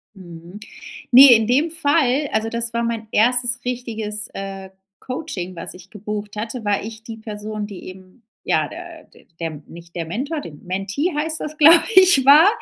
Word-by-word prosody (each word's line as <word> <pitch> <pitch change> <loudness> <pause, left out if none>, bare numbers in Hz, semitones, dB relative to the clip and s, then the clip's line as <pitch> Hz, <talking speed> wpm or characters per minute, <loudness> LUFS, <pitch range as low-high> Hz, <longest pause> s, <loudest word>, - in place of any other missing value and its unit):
Mhm. 175 +1 -12 0.5
Ne, 255 0 +9
in 220 -1 +2
dem 285 +7 +1
Fall 290 -3 +1
also, 220 +1 0
das 235 0 -3
war 235 0 -1
mein 230 -1 -3
1. 245 +2 +1
richtiges, 225 -4 -5
äh, 195 -1 -7 0.3
Coaching 250 - -6
was 165 - -8
ich 180 +1 -15
gebucht 210 0 -6
hatte, 225 +2 -5
war 205 -1 0
ich 220 +1 -9
die 225 0 -9
Person 215 -1 -6
die 200 -3 -10
eben 185 +4 -14 0.2
ja, - - 0
der - - -11 0.3
der 160 -3 -5
nicht 170 0 -14
der 165 -2 -4
Mentor 280 - -4
dem 150 - -12
Mentee 195 - -3
heißt 310 +2 -2
das, 305 0 -6
glaube 325 +2 +7
ich, 370 -8 +6
war. 305 +7 +8
225 Hz, 170 wpm, -20 LUFS, 195-265 Hz, 0.5 s, Ne